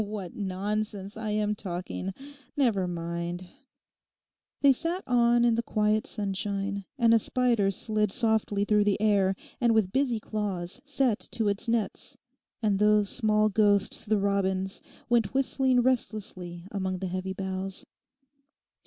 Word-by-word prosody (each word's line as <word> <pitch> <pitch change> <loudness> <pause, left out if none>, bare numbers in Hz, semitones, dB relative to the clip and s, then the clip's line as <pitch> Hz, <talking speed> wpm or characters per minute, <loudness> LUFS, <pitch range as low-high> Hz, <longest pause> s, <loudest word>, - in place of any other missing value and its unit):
What 205 -4 -6
nonsense 205 +1 -3
I 220 -1 -4
am 210 0 0
talking. 185 -1 -5 0.5
Never 220 -10 +2
mind.' 170 +1 -4 1.2
They 280 -1 +7
sat 335 +7 -2
on 240 -1 +3
in 235 - +4
the 230 - +1
quiet 215 -1 0
sunshine, 200 -1 -2
and 230 -3 +4
a 230 - +6
spider 235 -4 +2
slid 210 +1 0
softly 220 -3 +1
through 210 -1 +3
the 205 -1 +1
air 200 -3 +3 0.2
and 235 -2 +3
with 205 -4 +2
busy 260 -3 +1
claws 205 -1 -3
set 270 -6 +1
to 220 -2 +2
its 200 +4 -2
nets; 230 +4 -2 0.5
and 205 -2 +2
those 210 -1 +4
small 215 -3 +3
ghosts 205 +1 +2
the 215 0 +3
robins 195 -1 0 0.3
went 240 0 +1
whistling 260 -1 +2
restlessly 195 -8 -2
among 190 -2 -2
the 190 - -4
heavy 185 +1 -3
boughs. 190 0 -4
210 Hz, 135 wpm, -28 LUFS, 195-230 Hz, 1.2 s, They